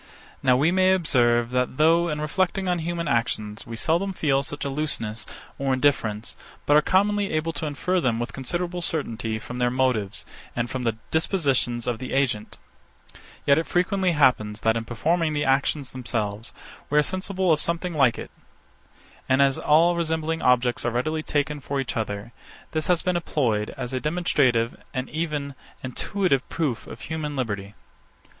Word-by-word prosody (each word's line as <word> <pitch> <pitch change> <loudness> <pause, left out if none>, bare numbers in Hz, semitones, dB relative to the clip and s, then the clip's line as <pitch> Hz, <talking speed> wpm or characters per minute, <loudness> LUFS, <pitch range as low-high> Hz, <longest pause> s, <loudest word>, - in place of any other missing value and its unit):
Now 130 -2 +4
we 150 +6 +3
may 185 0 +4
observe, 120 -8 +2
that, 125 0 0
though, 165 +2 +4
in 150 -1 -2
reflecting 185 +4 0
on 180 -1 +1
human 170 0 -3
actions, 110 -2 -1
we 115 - -6
seldom 170 - 0
feel 140 -6 +1
such 145 +1 -5
a - - -1
looseness, 135 -7 -2 0.3
or 135 -1 +1
indifference, 115 -6 0 0.3
but 145 - +4
are 150 - +7
commonly 205 +4 +2
able 160 +1 -1
to 155 +1 -3
infer 180 +5 0
them 120 -5 +1
with 120 - -4
considerable 175 +6 -3
certainty 115 -9 -2
from 125 +3 -7
their 125 0 +3
motives, 120 -6 0 0.3
and 120 0 -2
from 130 -2 -3
the 115 -1 0
dispositions 140 - +1
of 120 -2 -2
the 130 - -5
agent; 130 -6 0 0.9
yet 140 +2 +5
it 165 - -3
frequently 180 0 +1
happens, 125 -8 +2
that, 110 0 +2
in 115 0 -2
performing 160 +7 0
the 145 0 0
actions 135 0 +1
themselves, 115 -3 -3 0.4
we 150 - +2
are 150 - +6
sensible 185 +1 +1
of 155 - +2
something 170 +1 -1
like 135 -6 +3
it: - - -7 1.0
And 130 +1 +4
as 135 -1 +4
all 165 +3 +4
resembling 160 -1 -1
objects 125 -1 +2
are 120 - +1
readily 155 +7 -1
taken 150 -1 -1
for 140 +1 -3
each 135 0 -3
other, 110 0 -4 0.4
this 155 -1 -2
has 175 -2 +2
been 180 -1 +1
employed 115 -11 0
as 125 - -4
a 130 - 0
demonstrative 140 -7 +1
and 130 0 -2
even 150 -3 -2 0.3
intuitive 135 +3 0
proof 145 -8 -2
of - - -10
human 155 -2 -4
liberty. 105 -6 -3
140 Hz, 170 wpm, -25 LUFS, 120-165 Hz, 1.0 s, are